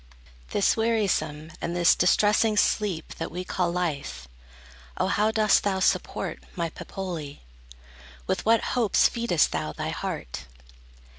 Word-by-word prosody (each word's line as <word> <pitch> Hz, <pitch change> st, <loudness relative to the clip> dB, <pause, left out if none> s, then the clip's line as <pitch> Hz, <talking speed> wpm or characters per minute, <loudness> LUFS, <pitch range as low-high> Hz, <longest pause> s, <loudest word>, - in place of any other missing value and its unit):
This 200 Hz, -, +2 dB
wearisome 190 Hz, -9 st, 0 dB
and 170 Hz, -, -3 dB
this 175 Hz, -1 st, +5 dB
distressing 210 Hz, +4 st, +3 dB
sleep 200 Hz, -6 st, 0 dB
That -, -, -3 dB
we 180 Hz, +2 st, -5 dB
call 180 Hz, -1 st, -1 dB
life, 155 Hz, -, -3 dB, 0.7 s
O -, -, +1 dB
how 205 Hz, +3 st, +2 dB
dost 215 Hz, -2 st, +3 dB
thou 195 Hz, -2 st, 0 dB
support, 190 Hz, -, -1 dB
My 170 Hz, -3 st, -2 dB
Pepoli? 170 Hz, -8 st, -6 dB, 0.8 s
With -, -, -1 dB
what 225 Hz, +1 st, +4 dB
hopes 235 Hz, -6 st, +4 dB
feedest 230 Hz, -9 st, +1 dB
thou 75 Hz, -1 st, -3 dB
Thy -, -, -4 dB
heart? 60 Hz, +1 st, -5 dB
180 Hz, 130 wpm, -26 LUFS, 160-210 Hz, 0.8 s, this